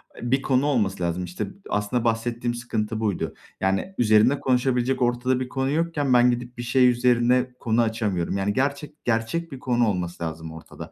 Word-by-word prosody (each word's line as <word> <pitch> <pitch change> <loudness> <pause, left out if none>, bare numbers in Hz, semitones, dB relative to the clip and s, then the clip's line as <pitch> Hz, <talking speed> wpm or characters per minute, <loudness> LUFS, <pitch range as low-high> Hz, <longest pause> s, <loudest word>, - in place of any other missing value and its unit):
eee, 120 +1 -5
bir 135 0 +3
konu 130 +1 +1
olması 100 -10 0
lazım 85 +1 -1
işte. 90 +1 -4 0.2
Aslında 105 +4 -1
bahsettiğim 120 +1 -1
sıkıntı 110 -2 -3
buydu. 105 -5 -1 0.3
Yani, 95 - -1
üzerine 110 +4 +4
konuşabilecek 125 0 +1
ortada 125 +1 +1
bir 125 -1 -4
konu 135 +1 -1
yokken 150 -4 0
ben 125 0 +6
gidip 120 0 -5
bir 120 - -4
şey 125 +1 +4
üzerine 125 +1 +2
konu 115 0 +1
açamıyorum. 105 -5 -1
Yani, 100 +1 0
gerçek, 140 +4 -2
gerçek 120 +9 -1
bir 135 - -7
konu 120 -3 +1
olması 90 -3 -3
lazım 80 0 -5
ortada. 80 - -10
120 Hz, 175 wpm, -24 LUFS, 105-130 Hz, 0.3 s, ben